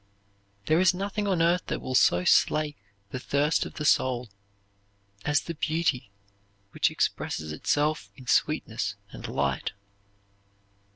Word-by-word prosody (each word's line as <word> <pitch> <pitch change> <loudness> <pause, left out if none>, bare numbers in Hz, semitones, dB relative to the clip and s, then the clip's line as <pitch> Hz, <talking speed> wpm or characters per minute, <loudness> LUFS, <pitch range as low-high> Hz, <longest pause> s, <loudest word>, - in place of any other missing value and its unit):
There 160 +2 +3
is 185 0 +4
nothing 205 +2 -2
on 180 -4 +2
earth 175 +2 +2
that - - -2
will 130 - -5
so 90 -7 +4
slake 150 -1 +3 0.4
the 130 - -4
thirst 145 +4 +1
of - - -13
the 150 - -4
soul 125 -5 +2 0.9
as 150 0 +2
the 170 - -5
beauty 155 -7 -1 0.6
which - - +2
expresses 80 0 -2
itself 145 - 0
in 130 - -13
sweetness - - 0 0.2
and - - -8
light. 70 -1 -1
150 Hz, 130 wpm, -27 LUFS, 125-165 Hz, 0.9 s, is